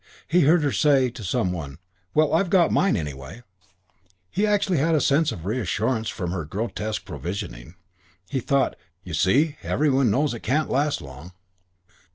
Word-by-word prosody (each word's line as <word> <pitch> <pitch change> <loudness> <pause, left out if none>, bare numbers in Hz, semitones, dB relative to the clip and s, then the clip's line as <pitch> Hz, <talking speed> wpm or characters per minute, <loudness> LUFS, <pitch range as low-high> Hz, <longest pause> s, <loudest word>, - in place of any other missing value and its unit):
He 175 +3 +3
heard 155 +3 +4
her 145 - +1
say 135 -4 +3
to 115 -2 -9
some 90 -1 0
one, 75 -6 -6 0.4
"Well, 155 0 +3
I've 175 +3 +2
got 175 -3 +4
mine, 195 -5 +3
anyway." 75 - -7 0.9
He 210 +2 +1
actually 200 -5 +1
had 160 +3 +2
a - - +3
sense 145 +2 +2
of 85 - -8
reassurance 110 +1 -1
from 90 -4 -4
her 90 -3 -3
grotesque 105 +5 -4
provisioning. 80 - -6 0.5
He 135 - -2
thought, 135 +2 +1 0.3
"You - - -8
see, 145 +9 +2
every 150 0 +1
one 130 -2 +3
knows 140 +6 +1
it 120 - -6
can't 140 +9 0
last 145 - 0
long." 70 +6 -11
125 Hz, 170 wpm, -24 LUFS, 90-150 Hz, 0.9 s, heard